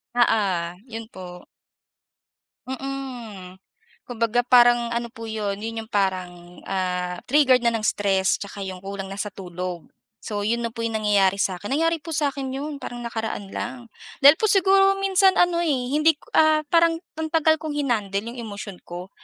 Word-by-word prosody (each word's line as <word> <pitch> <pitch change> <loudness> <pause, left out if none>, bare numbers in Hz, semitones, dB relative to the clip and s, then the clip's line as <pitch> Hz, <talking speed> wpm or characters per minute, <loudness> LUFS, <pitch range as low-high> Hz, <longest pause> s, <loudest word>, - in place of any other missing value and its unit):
Oo, 205 -7 +2 0.2
yun 225 -1 -8
po. 180 -1 -10 1.2
Mm. 250 -9 -7 0.4
Kumbaga 235 0 0
parang 240 -1 +5
ano 235 0 -2
po 225 0 -10
yun, 210 -3 -3
yun 225 +1 -4
yung 220 - -26
parang, 180 -3 -2
ah, 180 -1 -2
triggered 265 -3 +4
na 235 - +3
ng 225 - -1
stress 195 -2 +2
tsaka 200 0 -7
yung 190 -1 -6
kulang 195 0 -6
na 195 - -7
sa 210 +1 -3
tulog. 180 -2 -6 0.4
So, 205 -1 -3
yun 235 +2 0
na - - -2
po 230 - -6
yung 225 -1 -1
nangyayari 200 -3 +2
sa 185 -2 0
akin. 205 +3 -8
Nangyari 330 +3 +2
po 330 - -10
sa 295 -1 +1
akin 270 -1 -4
yun 285 +2 -4
parang 240 0 -6
nakaraan 225 -3 -4
lang. 245 -1 -6 0.3
Dahil 280 +1 +10
po - - 0
siguro 390 0 +4
minsan 385 0 +4
ano, 350 -1 +3
eh, 340 - 0 0.2
hindi 305 +3 +4
ko, - - -20
ah, 310 -1 +5
parang 335 -1 +4 0.2
ang 320 0 -3
tagal 315 -1 +4
kong 310 -2 -4
hinandle 215 -7 -1
yung - - -11
emosyon 200 -3 -7
ko 180 +2 -8
225 Hz, 175 wpm, -23 LUFS, 195-275 Hz, 1.2 s, Dahil